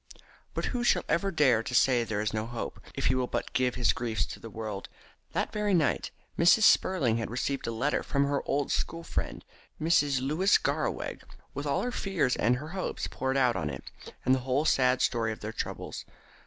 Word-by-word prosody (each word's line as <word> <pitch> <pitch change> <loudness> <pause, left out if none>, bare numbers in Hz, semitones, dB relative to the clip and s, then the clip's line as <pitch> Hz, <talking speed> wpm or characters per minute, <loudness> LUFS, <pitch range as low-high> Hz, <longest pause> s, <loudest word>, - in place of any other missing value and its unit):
But - - -1
who 245 -1 -1
shall 240 - +3
ever 195 +4 +1
dare 140 - +3
to 125 +2 -4
say 125 0 +5
that 115 - -5
there 105 -1 0
is 110 +1 -1
no 110 0 -2
hope, 120 -1 -5 0.2
if - - -3
he 130 - +4
will 130 -1 0
but - - -3
give 125 -1 +1
his 120 - +3
griefs 115 -2 -1
to - - -9
the 115 - -9
world? 110 -2 -6 0.4
That - - -1
very 210 -2 +1
night 160 -4 +1 0.3
Mrs. 175 +6 +6
Spurling 140 - +4
had 115 - -3
received 130 +3 -2
a - - -1
letter 125 +6 0
from 140 0 0
her 140 0 0
old 140 0 0
school 165 0 -2
friend, - - -4 0.3
Mrs. 145 -4 +3
Louis 155 +10 +3
Garraweg, - - -2 0.3
with - - -4
all - - +1
her 250 - -1
fears 185 - 0
and 120 +3 +2
her 150 +5 -6
hopes 185 +1 -3
poured 130 +1 -2
out 125 -3 +3
in 80 -5 -2
it, 70 -3 -8 0.3
and 130 - +5
the 130 - +2
whole 130 +4 0
sad 125 -3 +3
story 115 -2 +1
of 110 - -7
their 105 +1 -5
troubles. - - -5
130 Hz, 210 wpm, -29 LUFS, 115-155 Hz, 0.4 s, Mrs